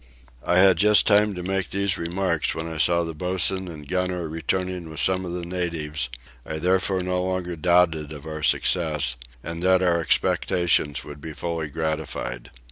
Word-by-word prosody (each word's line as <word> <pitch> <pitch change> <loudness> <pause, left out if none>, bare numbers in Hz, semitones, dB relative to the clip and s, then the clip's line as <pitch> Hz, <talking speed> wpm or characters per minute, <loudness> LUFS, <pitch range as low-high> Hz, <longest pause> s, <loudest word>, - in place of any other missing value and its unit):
I 90 - +2
had 95 -1 +6
just 105 +2 +6
time 105 -1 +4
to 90 - -5
make 95 0 -2
these 100 0 +1
remarks 85 -1 -1
when 80 0 -3
I 80 -1 -6
saw 85 +1 +3
the 80 0 -5
boatswain 95 +3 +1
and 75 -4 -9
gunner 90 -1 -2
returning 90 +2 -3
with 80 0 -7
some 95 +1 +1
of 85 - -5
the 90 -1 -4
natives: 80 -6 -2 0.3
I 80 - -5
therefore 95 +2 +1
no 90 0 -1
longer 90 -1 -2
doubted 85 -2 +2
of 75 -1 -9
our 80 -1 -6
success 75 -4 +1 0.3
and 85 0 -5
that 95 0 +3
our 85 -2 +2
expectations 85 -1 +1
would 75 -1 -10
be 80 0 -7
fully 85 -1 -3
gratified. 75 -6 -4
85 Hz, 175 wpm, -24 LUFS, 80-90 Hz, 0.3 s, had